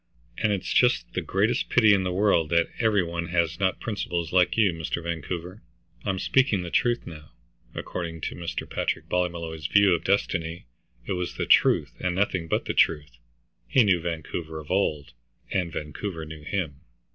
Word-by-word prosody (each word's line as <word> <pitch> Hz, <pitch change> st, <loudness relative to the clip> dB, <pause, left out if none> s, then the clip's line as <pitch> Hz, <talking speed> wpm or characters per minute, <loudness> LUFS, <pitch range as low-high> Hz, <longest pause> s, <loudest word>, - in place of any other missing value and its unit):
"And 110 Hz, -2 st, +2 dB
it's 100 Hz, -2 st, -2 dB
just 125 Hz, 0 st, +3 dB
the -, -, -1 dB
greatest 105 Hz, +5 st, 0 dB
pity 110 Hz, -4 st, +6 dB
in 100 Hz, -, +3 dB
the 90 Hz, -1 st, -1 dB
world 90 Hz, -4 st, +2 dB
that 85 Hz, 0 st, +2 dB
every 110 Hz, -4 st, +3 dB
one 85 Hz, 0 st, -4 dB
has 85 Hz, -1 st, 0 dB
not 95 Hz, -1 st, +1 dB
principles 90 Hz, -6 st, -3 dB
like 90 Hz, 0 st, +3 dB
you, 105 Hz, -5 st, +4 dB
Mr. 80 Hz, +1 st, -4 dB
Vancouver. 85 Hz, +3 st, -5 dB, 0.4 s
I'm 95 Hz, -, -1 dB
speaking 110 Hz, -3 st, +2 dB
the 85 Hz, -, -6 dB
truth 120 Hz, -1 st, +1 dB
now." 75 Hz, -3 st, -11 dB, 0.4 s
According 80 Hz, -2 st, -5 dB
to -, -, -3 dB
Mr. 85 Hz, -1 st, -5 dB
Patrick -, -, -2 dB
Ballymolloy's 85 Hz, -4 st, -2 dB
view 100 Hz, 0 st, +5 dB
of 85 Hz, -, -1 dB
destiny, 85 Hz, -5 st, -1 dB, 0.4 s
it -, -, -5 dB
was 90 Hz, -1 st, -3 dB
the -, -, -2 dB
truth -, -, +4 dB
and 90 Hz, -1 st, -1 dB
nothing 95 Hz, -3 st, 0 dB
but -, -, 0 dB
the -, -, -2 dB
truth. 75 Hz, -6 st, +1 dB, 0.5 s
He 130 Hz, -, +5 dB
knew 95 Hz, -5 st, +3 dB
Vancouver 80 Hz, -1 st, -4 dB
of 75 Hz, +1 st, -9 dB
old, 75 Hz, -8 st, 0 dB, 0.4 s
and 90 Hz, -4 st, 0 dB
Vancouver 80 Hz, +3 st, -5 dB
knew 80 Hz, 0 st, -9 dB
him. 75 Hz, -4 st, -3 dB
85 Hz, 175 wpm, -26 LUFS, 80-100 Hz, 0.5 s, pity